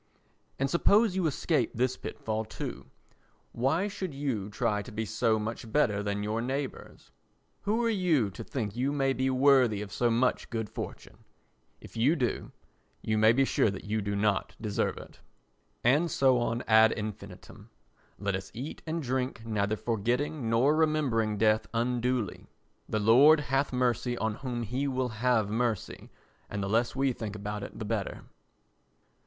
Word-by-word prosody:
And 135 - +1
suppose 200 - +3
you 185 -3 +1
escape 145 -3 0
this 125 +2 +1
pit - - -7
fall 110 0 -2
too. 110 - -7 0.6
Why 140 +11 +1
should 190 -7 -5
you 125 -8 -2
try 105 0 0
to 120 - -10
be 110 +1 -3
so 110 +1 +1
much 110 +1 -5
better 110 -8 +2
than 100 0 -2
your 110 +2 -1
neighbours? 135 +2 -5 0.5
Who 220 +4 +1
are - - +2
you 165 - +2
to 90 - -8
think 110 -6 -4
you 130 +3 0
may 135 -2 +1
be 130 0 0
worthy 130 -5 +4
of 105 -1 -6
so 120 +1 +2
much 120 +2 +1
good 110 -2 -4
fortune? - - -7 0.6
If - - -14
you 125 +8 +3
do, 125 -6 -2 0.5
you 110 - 0
may 110 +1 +6
be 135 +3 +3
sure 110 - +2
that 95 -1 -6
you 110 +1 -1
do 100 0 -2
not 100 0 0
deserve 105 -2 -1
it. - - -12 0.6
And 145 +8 +3
so 130 -4 +3
on 120 0 -1
ad 110 0 +6
infinitum. 105 -2 -8 0.5
Let 100 -1 -2
us 95 0 -6
eat 130 +6 -6
and 160 0 -2
drink 125 -2 -2
neither 110 -1 0
forgetting 120 +5 -1
nor 125 +7 +3
remembering 140 -9 +1
death 110 +1 +2
unduly. 120 -3 -1 0.4
The - - 0
Lord 130 +9 +7
hath 140 -1 0
mercy 125 -1 0
on 110 -1 -1
whom 120 0 -4
he 125 +6 -2
will 130 -2 -1
have 110 -2 +1
mercy 115 -2 -2 0.4
and 100 -1 -3
the - - -2
less 115 +4 +1
we 135 -1 +1
think 110 -3 -6
about 105 0 -5
it 100 - -8
the 110 - -5
better. 105 -2 -3
120 Hz, 170 wpm, -29 LUFS, 110-135 Hz, 0.6 s, Lord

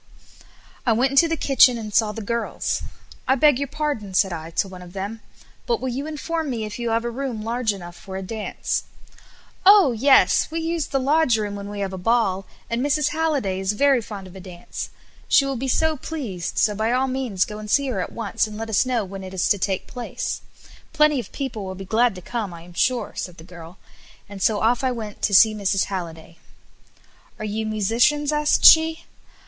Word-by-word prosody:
I 235 - +3
went 255 +4 +2
into 275 +5 +5
the 330 0 -1
kitchen 260 -4 +5
and 215 -2 -7
saw 215 0 +3
the 220 +1 -7
girls. 235 +3 -2 0.5
"I 265 - +4
beg 280 -1 +4
your 280 - -2
pardon," 285 -10 -3
said 190 -1 +3
I 160 -1 -6
to 170 - -1
one 185 -1 -10
of 180 0 -12
them; 200 +3 -5 0.5
"but 470 -2 +1
will 260 - -3
you 270 +5 -4
inform 315 0 -3
me 230 -4 -2
if 210 +2 -7
you 235 -1 -2
have 230 +1 0
a 240 - -2
room 245 -3 -4
large 230 0 0
enough 175 -3 -9
for 190 -1 -8
a 190 - -5
dance." 215 +2 -3 0.8
"Oh! 390 -7 +7
yes; 265 +4 +4
we 325 +1 -3
use 330 -1 -2
the 270 - 0
lodge 275 -2 +3
room 210 -2 -3
when 200 0 -7
we 205 -1 -5
have 195 -1 -3
a 190 - -5
ball, 195 -2 +1 0.2
and 235 +1 -2
Mrs. 290 +1 +1
Halliday 290 -12 -1
is 190 +2 0
very 270 +2 +3
fond 205 -3 -8
of 185 0 -13
a - - -8
dance; 180 -2 -8 0.4
she 275 - +5
will 275 0 -2
be 260 +2 -3
so 320 +4 +2
pleased, 255 - -5
so 210 - +3
by 220 +3 -1
all 255 +2 +2
means 255 -8 -1
go 210 0 -8
and 210 0 -8
see 280 +5 +2
her 215 -7 -2
at - - -5
once, 225 -1 -1
and 210 0 -9
let 225 0 -5
us 220 +4 +2
know 240 -5 0
when 195 0 -8
it 190 0 -8
is 185 - +1
to 205 - +2
take 190 0 -1
place. 245 -2 -5 0.5
Plenty 300 -3 +4
of 240 - -7
people 255 -7 -4
will 190 0 -6
be 195 +1 -8
glad 225 +2 +2
to 180 - -10
come 215 -6 -4
I 165 - -11
am 175 0 -14
sure," 250 +7 0
said 180 -1 -6
the 160 - -12
girl, 175 0 -12 0.5
and 200 -1 -10
so 210 +1 +2
off 235 +3 +2
I 260 - +2
went 220 -4 -7
to 200 - +2
see 220 +2 +7
Mrs. 200 -2 0
Halliday. 165 -2 -7 1.0
"Are 215 - -5
you 215 +1 -3
musicians?" 235 +8 +2
asked 300 0 +2
she. 320 0 +7
225 Hz, 220 wpm, -23 LUFS, 195-270 Hz, 1.0 s, Oh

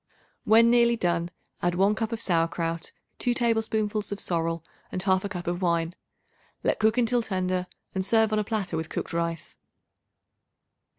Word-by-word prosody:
When 230 +2 +6
nearly 235 -1 +5
done, 170 -3 0 0.3
add 175 0 +1
1 195 +3 +3
cup 225 +1 -2
of 230 - -3
sauerkraut, 165 -2 0 0.3
2 245 -1 +1
tablespoonfuls 220 -3 0
of 205 - -3
sorrel 165 -2 -1 0.3
and 185 - -3
1/2 190 0 +2
cup 180 -3 -5
of 175 +1 -2
wine. 170 -1 +1 0.7
Let - - +1
cook 220 +2 +3
until 245 0 +2
tender 185 -3 -1 0.3
and 190 - -1
serve 220 +2 +3
on 215 - +2
a - - +1
platter 205 -5 -2
with 160 0 -3
cooked - - -4
rice. 170 -1 -3
190 Hz, 160 wpm, -27 LUFS, 170-220 Hz, 0.7 s, When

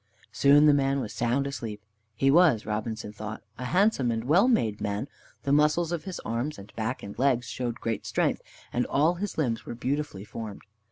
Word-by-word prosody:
Soon 145 +2 +5
the 150 - +7
man 140 -1 +2
was 110 - -4
sound 120 +4 0
asleep. 115 -6 -5 0.4
He 135 +4 +3
was, 150 -9 +5
Robinson 110 0 -3
thought, 105 +1 -7 0.2
a 125 - -4
handsome 180 - +2
and 115 -1 -1
well 170 - +4
made 110 - +1
man; 105 +4 -2 0.4
the 140 - -1
muscles 150 +3 +3
of 170 0 -3
his 190 -2 -5
arms 120 +7 -3
and 100 +1 -12
back 110 +3 -3
and 100 +2 -8
legs 130 -2 +2
showed 120 0 -4
great 115 -2 -3
strength, - - 0 0.3
and 125 - 0
all 155 +5 +3
his 200 +3 -5
limbs 120 -8 0
were - - -6
beautifully 130 -5 -3
formed. 110 -2 -7
125 Hz, 190 wpm, -27 LUFS, 110-150 Hz, 0.4 s, the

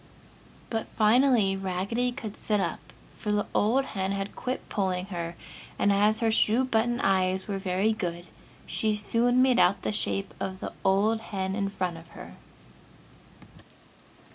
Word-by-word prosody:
But, 225 -1 -2
finally 225 -2 +4
Raggedy 195 +6 -1
could 225 -5 -7
sit 210 -1 -1
up, - - -2 0.4
for 210 - -2
the 205 0 +1
old 250 +6 +2
hen 195 -3 -3
had 195 0 -4
quit 255 +1 -4
pulling 185 -2 -1
her, 170 0 -4 0.4
and 200 - +3
as 210 +3 +3
her 225 -1 +2
shoe 225 +3 +4
button 240 0 0
eyes 190 -1 +1
were 200 -2 -3
very 190 +3 +1
good, 175 -4 -4 0.4
she 215 -1 0
soon 240 +4 +2
made 255 -2 +3
out 190 +3 +3
the - - 0
shape 195 -2 +1
of 190 -1 -4
the - - -6
old 210 +4 +2
hen 190 -3 -3
in 200 -1 -1
front 180 -4 -3
of 165 0 -13
her. - - -10
205 Hz, 155 wpm, -27 LUFS, 190-225 Hz, 0.4 s, finally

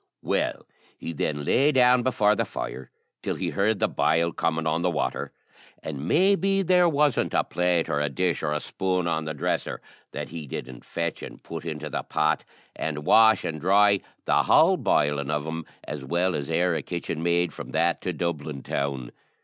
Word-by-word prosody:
Well, - - -1 0.3
he 85 - -6
then 75 -1 -2
lay 140 - +3
down 125 -2 +5
before 110 -4 +3
the - - +1
fire 65 - -6 0.3
till - - -2
he - - -3
heard 105 +2 +1
the - - +2
boil 85 +2 +1
coming 80 -1 -1
on 80 +1 0
the 90 - +2
water, 85 - -2 0.5
and 75 0 -5
maybe 195 - +3
there 180 -1 +4
wasn't 145 -3 +1
a - - +3
plate, 90 -1 0
or 75 - 0
a 75 0 0
dish, 90 +4 -1
or 75 - -1
a 75 - 0
spoon 90 +3 -1
on 80 -2 -1
the 80 -1 -4
dresser 90 +5 -2 0.3
that - - -5
he 80 -2 -7
didn't 65 -1 -7
fetch 85 -1 -3
and - - -10
put 80 -1 -7
into 75 -2 -4
the 70 - -3
pot, 75 0 0 0.3
and 75 -1 -4
wash 110 -2 +6
and 80 -2 -4
dry 100 +2 +4 0.3
the - - +3
whole - - +5
bilin' 70 -1 +1
of 75 -1 -1
'em 80 0 -5 0.2
as 75 -2 -6
well 85 +6 0
as 70 0 -3
e'er 85 +2 +2
a 80 - -1
kitchen 85 0 -4
maid 85 +1 +1
from - - -8
that 85 +2 +1
to 90 - -2
Dublin 75 -4 -4
town. 70 -3 -3
85 Hz, 190 wpm, -25 LUFS, 75-95 Hz, 0.5 s, wash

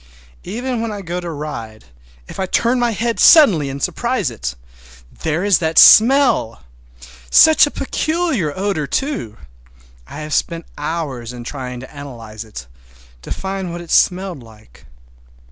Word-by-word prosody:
Even 240 +4 -4
when 230 -1 -3
I 205 -1 -7
go 175 +1 -4
to 175 -1 -6
ride, 120 - -7 0.4
if - - -10
I 190 - -1
turn 240 +6 +1
my 240 -1 +1
head 230 +1 -2
suddenly 195 - +6
and 135 0 -6
surprise 235 - -1
it—there 60 - -7
is 205 -3 +3
that 160 -1 -2
smell! 240 - +6 0.7
Such 315 -1 +6
a - - -3
peculiar 305 - -2
odor, 190 -7 -2
too! 270 - -3 0.7
I - - -9
have 150 0 -6
spent 165 +2 -1
hours 145 -6 -4
in 120 -1 -9
trying 125 -1 -7
to 130 +3 -13
analyze 115 -6 -9
it, 105 - -10 0.6
to - - -11
find 190 -2 -4
what 175 - -6
it 170 - -10
smelled 185 -5 +1
like. 110 - -18
165 Hz, 145 wpm, -18 LUFS, -, 0.7 s, suddenly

